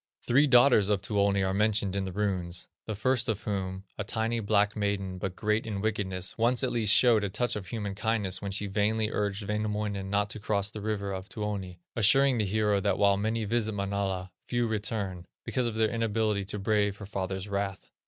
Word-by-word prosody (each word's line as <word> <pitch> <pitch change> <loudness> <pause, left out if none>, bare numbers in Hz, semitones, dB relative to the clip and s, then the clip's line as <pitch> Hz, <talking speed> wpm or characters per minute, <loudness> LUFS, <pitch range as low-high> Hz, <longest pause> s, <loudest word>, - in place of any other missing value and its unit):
Three 140 +5 +4
daughters 120 -5 +6
of 100 -2 +1
Tuoni 100 -1 +2
are 95 0 0
mentioned 105 -1 +1
in 100 -1 -1
the 95 - -4
runes, 90 -3 -1 0.2
the 110 - -2
first 125 +3 +1
of 110 -2 -2
whom, 95 -2 -3 0.2
a - - 0
tiny, 115 +3 -1
black 105 -1 +2
maiden, 100 -3 -2
but 95 0 -3
great 105 +3 0
in 105 -3 -3
wickedness, 95 -3 -2
once 120 +2 +2
at - - +1
least 110 -3 +2
showed 115 -3 +5
a 100 - -1
touch 120 +6 0
of 100 -3 -5
human 105 -1 -4
kindness 105 -3 -1
when 100 - -3
she 100 +1 -1
vainly 105 +2 0
urged 100 0 -2
Wainamoinen 105 -2 -2
not 100 +1 0
to 110 - -5
cross 100 -1 0
the 105 - -7
river 100 -2 -2
of 95 +1 -6
Tuoni, 100 -5 -4
assuring 125 +3 +4
the 105 - +2
hero 105 0 +2
that 95 - +1
while 100 -1 +4
many 110 +2 -1
visit 110 0 0
Manala, 100 -2 -2 0.2
few 120 -1 +1
return, 100 -4 -2 0.2
because 125 -2 0
of 115 - -3
their 110 -1 +2
inability 110 -3 0
to 105 +2 -4
brave 105 -1 +1
her 105 - -8
father's 95 -1 -4
wrath. 100 -1 -3
105 Hz, 205 wpm, -29 LUFS, 100-110 Hz, 0.2 s, daughters